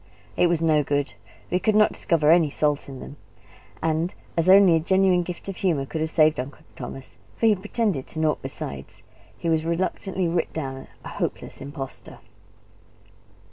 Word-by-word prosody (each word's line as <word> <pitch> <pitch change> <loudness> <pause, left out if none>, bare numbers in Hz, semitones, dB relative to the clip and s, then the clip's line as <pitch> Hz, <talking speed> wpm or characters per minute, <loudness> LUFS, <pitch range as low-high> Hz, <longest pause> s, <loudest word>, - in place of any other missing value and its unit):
It 180 - +4
was 170 -1 +1
no 155 -2 +4
good; 145 0 -1 0.4
we 180 - +2
could 215 +2 +1
not 215 0 +5
discover 155 -2 +2
any 165 -3 +5
salt 145 0 0
in 135 -1 -8
them. 145 - -10 0.7
And 160 +2 0 0.2
as 165 +2 +2
only 195 -2 +8
a - - +3
genuine 190 +1 +3
gift 175 +2 -7
of 195 - -5
humour 160 -8 0
could 155 +3 -4
have 160 - 0
saved 155 -2 +3
Uncle 130 +2 -6
Thomas, 135 -1 -9 0.2
for - - +1
he 220 - +6
pretended 205 - -1
to 160 - -6
naught 155 -1 +1
besides, 70 -1 -7 0.3
he - - -4
was 160 -1 +2
reluctantly 185 +2 -1
writ 165 0 -1
down 135 -4 -5 0.2
a - - -5
hopeless - - -4
impostor. 140 -1 -8
165 Hz, 175 wpm, -24 LUFS, 150-185 Hz, 0.7 s, only